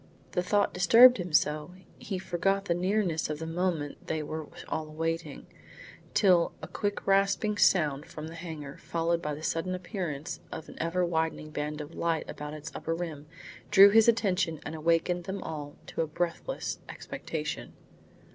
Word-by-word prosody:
The 180 - +1
thought 200 +3 +2
disturbed 235 +7 +8
him 180 -2 -4
so 150 +3 +1 0.2
he 195 - -4
forgot 195 +2 0
the 175 - +1
nearness 180 -3 0
of 150 - -2
the 160 - -5
moment 165 -3 -2
they 160 -1 -1
were 155 +1 -5 0.2
all 155 -1 -3
awaiting 165 +2 -3 0.7
till 180 -4 +4
a - - -7
quick 205 -1 -3
rasping 195 +2 +2
sound 150 -5 +3
from 155 0 -7
the 160 - -8
hangar, 155 -4 -7
followed 170 0 0
by 150 -2 -2
the 155 - -10
sudden 175 +3 -1
appearance 175 -5 -4
of 160 - -7
an - - -11
ever 170 +2 +1
widening 160 -2 -1
band 150 0 -3
of 150 +2 -9
light 165 -1 -1
about 150 +1 -6
its 150 - -7
upper 165 - -2
rim, 160 -4 -5 0.4
drew 200 +5 +9
his 225 +1 +6
attention 190 -8 +2
and - - -4
awakened 170 +2 +1
them 195 0 -4
all 145 -2 -6
to - - -3
a 160 - 0
breathless 175 - -3
expectation. - - -5
165 Hz, 165 wpm, -29 LUFS, 155-185 Hz, 0.7 s, drew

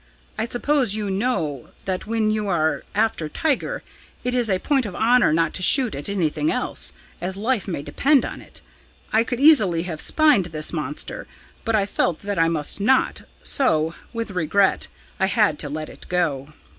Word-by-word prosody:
I 225 - -2
suppose 245 -3 +1
you 210 -2 -2
know 190 - -2 0.2
that 185 +1 -3
when 220 -1 +1
you 215 -1 -1
are 160 -4 +1
after 210 -7 0
tiger, 320 - -1 0.4
it 250 0 -1
is 245 -3 +1
a 190 - +2
point 265 +3 0
of 185 - -8
honour 240 -4 +4
not 165 0 +1
to - - -3
shoot 245 - +4
at 145 +5 -4
anything 200 - 0
else, - - -1 0.3
as 185 +1 -3
life 220 0 -1
may 170 -7 -3
depend 280 - +2
on - - -7
it. - - -9 0.5
I 220 +1 +4
could 245 +1 -3
easily 215 - +5
have 165 -4 -4
spined 300 - +4
this 155 -1 -2
monster, 150 -2 -3 0.4
but 230 -1 0
I 200 -2 +2
felt 175 -4 -1
that 200 -2 -3
I 165 - +4
must 160 +2 -1
not 255 +6 +2 0.2
so, 160 - +2 0.2
with 230 -3 -4
regret, 190 +2 +1 0.3
I 190 - +3
had 205 -8 +2
to 145 - -3
let 155 +1 -4
it - - -12
go.' 155 -6 -1
200 Hz, 180 wpm, -22 LUFS, 165-240 Hz, 0.5 s, easily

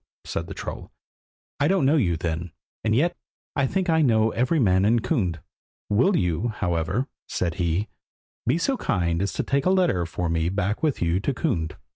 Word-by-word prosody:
said - - -3
the - - -7
troll, - - -6 0.7
"I 145 - +3
don't 185 -5 +2
know 145 +4 +4
you 90 - +2
then. 85 0 -3 0.3
And 110 0 +2
yet 165 +8 +2 0.4
I 140 -2 +2
think 190 +3 -1
I 160 -1 +3
know 110 -5 +3
every 130 +7 +1
man 95 -8 +3
in 115 +3 +3
Kund. 95 - -1 0.5
Will 125 - +4
you, 90 +5 0
however," 90 - -1 0.2
said 85 -2 -1
he, 85 +5 0 0.6
"be 130 +7 +3
so 265 +10 0
kind 85 - 0
as 100 - 0
to - - -1
take 140 +4 0
a - - +5
letter 175 - +2
for 90 +1 -3
me 80 0 0
back 100 +2 -1
with 150 - 0
you 85 +2 +1
to 135 +7 -1
Kund?" 85 - -1
105 Hz, 190 wpm, -25 LUFS, 85-140 Hz, 0.7 s, a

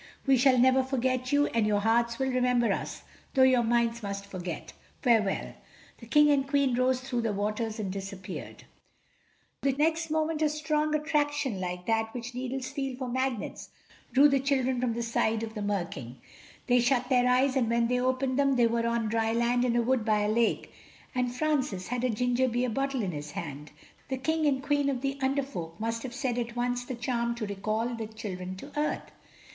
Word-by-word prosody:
We 270 -1 +5
shall 255 +1 +4
never 260 +2 +5
forget 255 -1 -1
you, 290 0 +4
and 230 -5 +1
your 205 -1 +2
hearts 235 +2 +2
will 265 -1 0
remember 250 -2 +2
us, - - -5 0.3
though 260 - +6
your 260 -2 +5
minds 235 0 +1
must 200 -1 -4
forget. 185 -3 -6 0.3
Farewell." 225 -6 +2 0.5
The 230 - -12
King 295 +4 +5
and 275 -1 +2
Queen 275 -2 +2
rose 255 +1 +2
through 255 -2 -2
the 225 -2 0
waters 215 +2 -2
and 195 -3 -2
disappeared. 195 -1 -7 1.0
Next 315 +4 +1
moment 315 0 0
a 305 - +3
strong 305 0 0
attraction 295 -6 0
like 180 0 -4
that 225 +1 0
which 240 0 -5
needles 255 +1 -4
feel 270 -2 -4
for 260 -1 -4
magnets 260 -2 -3 0.4
drew 275 +4 +7
the 275 -1 +2
children 260 -2 +1
from 245 -2 +1
the 235 - -2
side 225 -1 0
of 220 -1 -5
the 215 - -5
Mer 200 -3 0
King. 125 -6 -9 0.5
They 245 -1 +4
shut 250 +1 +2
their 250 -1 +4
eyes, 260 +2 +3
and 245 -4 +2
when 235 0 +2
they 250 +1 +1
opened 255 +1 0
them 275 -1 +3
they 240 -2 +4
were 230 0 +1
on 235 -1 0
dry 225 0 +1
land 240 +1 +2
in 245 -1 +1
a 240 - +3
wood 255 -1 +1
by 215 -1 +2
a 210 - +1
lake—and 240 +2 -2
Francis 260 -11 -1
had 245 0 -2
a 255 - +2
ginger 245 +3 +1
beer 245 0 0
bottle 270 0 -1
in 190 - -1
his 150 -1 -6
hand. 150 -5 -6 0.4
The 265 - -1
King 315 +3 0
and 265 -2 +1
Queen 290 -1 +1
of 260 -3 -2
the 275 0 -2
Under 275 +1 +1
Folk 170 -11 -7
must 230 +1 -2
have 250 -1 -6
said 255 -3 -1
at 235 0 -4
once 245 0 -1
the 255 - -5
charm 235 -1 -1
to 230 -2 -3
recall 215 +3 -2
the 230 -2 -4
children 185 -4 -6
to 280 +10 -10
earth. 300 +1 -2
245 Hz, 200 wpm, -29 LUFS, 225-265 Hz, 1.0 s, drew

